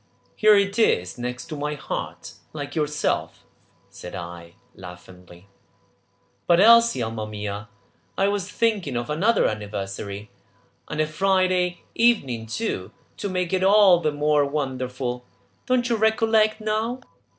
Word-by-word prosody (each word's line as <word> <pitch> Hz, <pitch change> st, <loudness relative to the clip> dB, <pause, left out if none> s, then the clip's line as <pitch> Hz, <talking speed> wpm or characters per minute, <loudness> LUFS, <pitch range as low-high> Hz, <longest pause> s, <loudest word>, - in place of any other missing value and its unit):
"Here 215 Hz, -1 st, +6 dB
it 200 Hz, +2 st, +1 dB
is 90 Hz, -, +1 dB
next 125 Hz, +5 st, -5 dB
my 150 Hz, 0 st, -3 dB
heart, 145 Hz, -, -6 dB, 0.2 s
like 145 Hz, -2 st, -6 dB
yourself," 150 Hz, -1 st, -1 dB, 0.4 s
said 90 Hz, -, -10 dB
I 85 Hz, 0 st, -9 dB, 0.2 s
laughingly. 90 Hz, 0 st, -13 dB, 1.0 s
"But, 170 Hz, 0 st, +5 dB
Elsie, 230 Hz, -, +6 dB
alma 110 Hz, -1 st, -4 dB
mia, 105 Hz, 0 st, -6 dB, 0.5 s
I 195 Hz, -, +3 dB
was 200 Hz, -2 st, -2 dB
thinking 205 Hz, -, 0 dB
of 120 Hz, +3 st, -4 dB
another 205 Hz, +9 st, +2 dB
anniversary, 100 Hz, -1 st, -5 dB, 0.6 s
and 150 Hz, -, -5 dB
a 155 Hz, -, +3 dB
Friday 185 Hz, +1 st, +1 dB
evening 135 Hz, -, +1 dB
too, 220 Hz, -, -3 dB, 0.3 s
to 205 Hz, -, -4 dB
make 180 Hz, -1 st, -2 dB
it 185 Hz, 0 st, +1 dB
all 195 Hz, -2 st, +6 dB
the 155 Hz, -3 st, 0 dB
more 150 Hz, 0 st, +2 dB
wonderful! 130 Hz, -3 st, -3 dB, 0.4 s
Don't 255 Hz, -1 st, +2 dB
you 235 Hz, -, +1 dB
recollect 220 Hz, 0 st, +2 dB
now?" 220 Hz, +4 st, -2 dB
150 Hz, 130 wpm, -24 LUFS, -, 1.0 s, Here